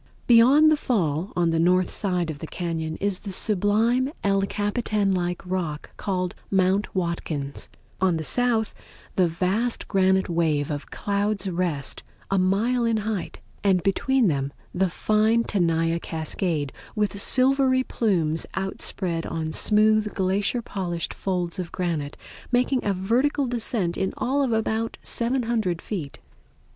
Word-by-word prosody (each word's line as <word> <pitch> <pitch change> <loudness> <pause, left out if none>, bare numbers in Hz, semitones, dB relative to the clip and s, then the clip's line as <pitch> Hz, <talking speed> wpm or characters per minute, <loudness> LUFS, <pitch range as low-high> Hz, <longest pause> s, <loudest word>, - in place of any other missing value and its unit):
Beyond 260 +7 +6
the 310 - +3
Fall, 175 - -1
on 170 -1 +2
the 165 - +1
north 180 +2 +3
side 180 -4 -1
of 145 - -9
the 160 - -6
cañon 160 -2 -3
is 200 -1 -1
the 205 - -7
sublime 220 +7 +1
Ed 195 0 +1
Capitan 205 -1 0
like 180 -1 -2
rock 175 -5 -4
called 185 -3 -2 0.2
Mount 195 +2 +1
Watkins; 165 -5 -3 0.3
on 185 -3 +3
the 160 - -3
south 235 +3 +2 0.4
the 185 -2 +4
vast 190 +8 -1
granite 190 -1 +2
wave 160 -4 0
of 145 0 -5
Clouds' 205 0 -1
Rest, 170 -6 -2 0.3
a 195 - +3
mile 215 +7 +2
in 230 -1 +2
height; 215 -5 -4 0.2
and 190 -3 +3
between 250 +6 +2
them 140 -6 0 0.2
the 185 +1 +1
fine 215 +5 +2
Tenaya 165 -5 +1
Cascade 160 -2 -3 0.2
with 205 -1 0
silvery 260 +1 +4
plumes 170 -11 0
outspread 190 -3 -2
on 160 -1 -3
smooth 215 +2 +3
glacier 200 +5 0
polished 175 -5 -3
folds 180 -1 -2
of 175 -2 -4
granite, 165 -6 -3 0.3
making 250 +1 +2
a 200 -2 0
vertical 250 +9 +1
descent 225 -7 -1
in 190 - -1
all 275 +3 0
of 265 -4 +1
about 225 0 -1
700 235 -7 0
feet. 165 -10 -5
195 Hz, 140 wpm, -24 LUFS, 170-220 Hz, 0.4 s, Beyond